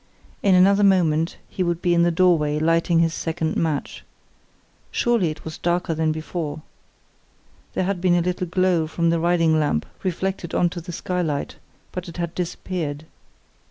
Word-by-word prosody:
In 195 -2 +4
another 200 +3 +5
moment 165 -5 +3
he - - -5
would 170 -2 0
be 175 0 +1
in 170 - +4
the 170 - +4
doorway 165 -4 +3
lighting 165 +2 +2
his 165 -1 +1
second 160 -1 -2
match. 155 -4 -2 0.9
Surely 235 -8 +1
it 155 - -8
was 160 0 -7
darker 175 -1 0
than 160 0 +1
before? 155 -1 -4 1.1
There - - +1
had 185 -1 -2
been 180 -1 +3
a 175 - +3
little 180 +1 -2
glow 175 -2 +1
from 170 +1 0
the 170 - +1
riding 165 -2 +3
lamp 145 - 0 0.2
reflected 185 -1 -3
on 175 -1 +2
to 175 - -6
the 175 +2 -8
skylight, 175 -5 -2 0.3
but 180 -1 -6
it 170 - -10
had 170 -1 -3
disappeared. 165 -4 -4
170 Hz, 165 wpm, -23 LUFS, 160-180 Hz, 1.1 s, another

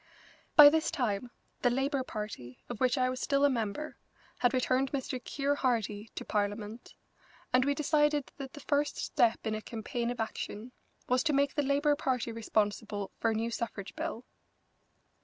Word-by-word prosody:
By 295 -1 +12
this 320 0 +1
time 240 -2 -1 0.3
the 245 - +4
Labour 270 +3 0
Party, 210 - -6
of 240 -3 -5
which 255 +2 +2
I 255 -1 +3
was 255 0 -3
still 280 0 +3
a 285 - +4
member, 235 +5 -3 0.4
had 245 - +3
returned 260 +1 +1
Mr. 260 -2 -3
Keir 280 0 0
Hardie 220 -5 -1
to - - -5
Parliament, 210 +2 -3 0.6
and 255 0 +5
we 285 0 +1
decided 295 -1 +2
that 275 -2 -7
the 290 - -9
first 290 +1 0
step 230 -1 +1
in 220 - 0
a 215 - -3
campaign 235 +2 -3
of 245 - -4
action 220 +1 -4 0.4
was 250 0 +3
to 305 - +2
make 280 0 +2
the 295 - +1
Labour 285 +1 +2
Party 250 -5 -1
responsible 210 -2 -1
for 230 - +2
a 220 - 0
new 230 +2 -1
suffrage 220 -4 -5
bill. 315 -7 -4
250 Hz, 175 wpm, -31 LUFS, 220-280 Hz, 0.6 s, By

